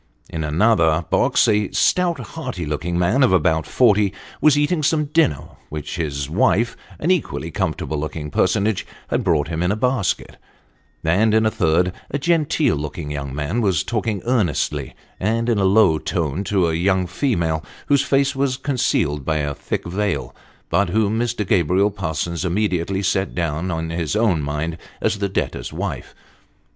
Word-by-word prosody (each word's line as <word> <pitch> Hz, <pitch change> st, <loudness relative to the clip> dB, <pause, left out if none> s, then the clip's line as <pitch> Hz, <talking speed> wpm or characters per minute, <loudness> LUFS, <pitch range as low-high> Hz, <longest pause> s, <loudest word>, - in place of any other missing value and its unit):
In 80 Hz, -1 st, -3 dB
another 80 Hz, -1 st, +2 dB
box -, -, +3 dB
a 105 Hz, -1 st, +2 dB
stout, 180 Hz, -2 st, +2 dB
hearty 125 Hz, -, -5 dB
looking 75 Hz, +4 st, -2 dB
man, 95 Hz, +10 st, +2 dB
of 130 Hz, -, +5 dB
about 80 Hz, -3 st, +2 dB
forty, 105 Hz, -5 st, +3 dB, 0.3 s
was 150 Hz, -2 st, +5 dB
eating 150 Hz, +3 st, +1 dB
some 150 Hz, +1 st, +2 dB
dinner 145 Hz, -, +1 dB, 0.2 s
which 75 Hz, -1 st, -5 dB
his 70 Hz, -4 st, -2 dB
wife 110 Hz, +8 st, +2 dB, 0.2 s
an 170 Hz, -, 0 dB
equally 180 Hz, -4 st, -1 dB
comfortable 80 Hz, -, -2 dB
looking 75 Hz, 0 st, -5 dB
personage 100 Hz, +2 st, +1 dB, 0.3 s
had -, -, 0 dB
brought 80 Hz, -3 st, +1 dB
him 80 Hz, 0 st, -2 dB
in 90 Hz, +2 st, +1 dB
a -, -, +1 dB
basket: 125 Hz, -3 st, -1 dB, 0.7 s
and 105 Hz, +7 st, +3 dB
in 110 Hz, 0 st, +3 dB
a 110 Hz, -, +2 dB
third, 90 Hz, 0 st, +1 dB, 0.2 s
a 140 Hz, -, -1 dB
genteel 155 Hz, -, +1 dB
looking 75 Hz, +1 st, -5 dB
young 70 Hz, -2 st, -5 dB
man 80 Hz, +11 st, -1 dB
was 95 Hz, -7 st, +1 dB
talking 110 Hz, -4 st, -2 dB
earnestly, 90 Hz, -, 0 dB, 0.2 s
and 115 Hz, +4 st, 0 dB
in 115 Hz, -4 st, +2 dB
a 95 Hz, -, +2 dB
low 95 Hz, -5 st, +4 dB
tone, 85 Hz, 0 st, -2 dB
to 95 Hz, -4 st, +2 dB
a 80 Hz, -, 0 dB
young 95 Hz, +2 st, +1 dB
female, 85 Hz, -, -1 dB, 0.2 s
whose 140 Hz, -1 st, +3 dB
face 140 Hz, 0 st, +1 dB
was 135 Hz, -1 st, 0 dB
concealed 125 Hz, -, 0 dB
by 80 Hz, +3 st, 0 dB
a 75 Hz, -1 st, -1 dB
thick 70 Hz, -, -4 dB
veil, 100 Hz, +2 st, -2 dB, 0.4 s
but 100 Hz, -2 st, +2 dB
whom 110 Hz, +3 st, +1 dB
Mr. 120 Hz, -3 st, -1 dB
Gabriel 95 Hz, +3 st, +2 dB
Parsons 85 Hz, -3 st, -3 dB
immediately 95 Hz, 0 st, 0 dB
set 95 Hz, 0 st, 0 dB
down 85 Hz, +1 st, -2 dB
in 80 Hz, -1 st, -3 dB
his 85 Hz, +1 st, -2 dB
own 105 Hz, -8 st, +2 dB
mind 75 Hz, +3 st, -3 dB, 0.2 s
as 105 Hz, -, 0 dB
the 100 Hz, -1 st, -1 dB
debtor's -, -, -3 dB
wife. 80 Hz, -6 st, -5 dB
95 Hz, 165 wpm, -21 LUFS, 80-110 Hz, 0.7 s, of